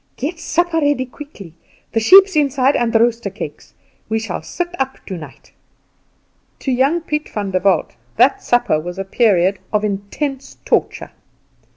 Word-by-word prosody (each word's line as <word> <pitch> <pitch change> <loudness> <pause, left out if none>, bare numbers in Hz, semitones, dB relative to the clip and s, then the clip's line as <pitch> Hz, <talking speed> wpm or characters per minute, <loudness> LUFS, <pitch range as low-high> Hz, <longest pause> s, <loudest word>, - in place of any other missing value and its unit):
Get 320 +6 -4
supper 345 0 0
ready 290 -3 +1
quickly; 250 - -12 0.4
the 225 - +1
sheep's 385 - +7
inside 280 -2 +2
and 235 -1 +1
roaster 230 -2 +2
cakes. 150 - -9 0.3
We 220 - +1
shall 220 -5 -4
sit 350 -1 -4
up 265 0 -2
tonight." 160 -8 -9 1.1
To 270 - -1
young 275 +7 +2
Piet 300 -1 -3
Vander 195 -3 -2
Walt 195 - +2 0.2
that 400 - +4
supper 240 - +2
was 175 +3 -7
a 195 - -3
period 195 -3 +2
of 210 0 +1
intense 210 +8 -4
torture. - - 0
240 Hz, 145 wpm, -18 LUFS, 195-290 Hz, 1.1 s, sheep's